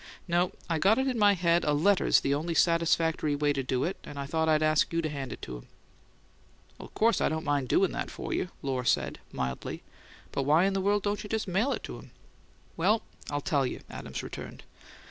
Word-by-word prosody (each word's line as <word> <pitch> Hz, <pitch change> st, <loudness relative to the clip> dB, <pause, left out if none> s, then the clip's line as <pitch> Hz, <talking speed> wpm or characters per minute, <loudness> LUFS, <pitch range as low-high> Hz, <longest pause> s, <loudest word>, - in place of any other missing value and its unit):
No; 175 Hz, +1 st, +2 dB, 0.2 s
I 165 Hz, -2 st, 0 dB
got 200 Hz, +7 st, +4 dB
it 265 Hz, -, +1 dB
in 250 Hz, -3 st, -1 dB
my 205 Hz, -1 st, +6 dB
head 170 Hz, -1 st, +2 dB
a 150 Hz, -, +2 dB
letter's 185 Hz, +7 st, +4 dB
the 140 Hz, -, +1 dB
only 165 Hz, +4 st, -2 dB
satisfactory 165 Hz, -3 st, +2 dB
way 145 Hz, 0 st, +1 dB
to 140 Hz, -, -1 dB
do 130 Hz, 0 st, -1 dB
it, 185 Hz, -, -2 dB
and 145 Hz, -, -9 dB
I 140 Hz, -, -3 dB
thought 160 Hz, +2 st, 0 dB
I'd 155 Hz, 0 st, +3 dB
ask 155 Hz, 0 st, +3 dB
you 165 Hz, -, 0 dB
to 160 Hz, -2 st, -1 dB
hand 140 Hz, -3 st, -5 dB
it -, -, -8 dB
to 60 Hz, -1 st, -6 dB
him." -, -, -14 dB, 1.1 s
"Well, -, -, -8 dB
of -, -, -28 dB
course 230 Hz, +1 st, +3 dB
I -, -, +3 dB
don't 160 Hz, +1 st, -3 dB
mind 145 Hz, -3 st, 0 dB
doin' 195 Hz, -, +3 dB
that -, -, -4 dB
for -, -, -5 dB
you," 180 Hz, -, -1 dB
Lohr 130 Hz, -2 st, -1 dB
said, -, -, 0 dB
mildly. 65 Hz, -1 st, -4 dB, 0.5 s
"But -, -, -1 dB
why 150 Hz, +5 st, +4 dB
in 195 Hz, -, +1 dB
the 195 Hz, -, 0 dB
world 205 Hz, +1 st, +1 dB
don't 205 Hz, 0 st, -1 dB
you 210 Hz, -, -8 dB
just 220 Hz, -1 st, -1 dB
mail 200 Hz, +9 st, +1 dB
it -, -, -3 dB
to -, -, -7 dB
him?" -, -, -14 dB, 0.7 s
"Well, 205 Hz, +7 st, +2 dB, 0.3 s
I'll 145 Hz, 0 st, -2 dB
tell 140 Hz, -1 st, +1 dB
you," 125 Hz, -, -3 dB
Adams -, -, -6 dB
returned. -, -, -8 dB
160 Hz, 230 wpm, -29 LUFS, 145-195 Hz, 1.1 s, my